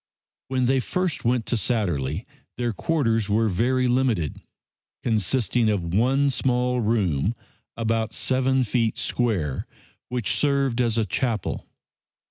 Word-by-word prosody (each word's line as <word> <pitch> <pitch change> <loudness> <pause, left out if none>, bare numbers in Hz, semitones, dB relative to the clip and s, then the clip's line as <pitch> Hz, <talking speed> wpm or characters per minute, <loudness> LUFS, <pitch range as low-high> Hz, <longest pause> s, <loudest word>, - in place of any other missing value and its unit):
When 130 -1 0
they 135 +2 +3
first 180 +3 -2
went 120 -1 +1
to - - 0
Satterlee 95 - -1 0.3
their 120 -2 -1
quarters 115 -6 0
were 110 +2 +2
very 125 +7 +1
limited, 120 - 0 0.6
consisting 115 +1 +1
of 90 -5 -1
one 135 +7 +3
small 125 -1 +1
room, 105 -4 +1 0.4
about 115 -1 0
seven 130 +2 +1
feet 115 -1 0
square, 95 - -1 0.4
which 120 -5 -1
served 135 -1 +1
as 115 -2 +1
a 110 - +2
chapel. 110 +1 -2
115 Hz, 120 wpm, -24 LUFS, 105-130 Hz, 0.6 s, they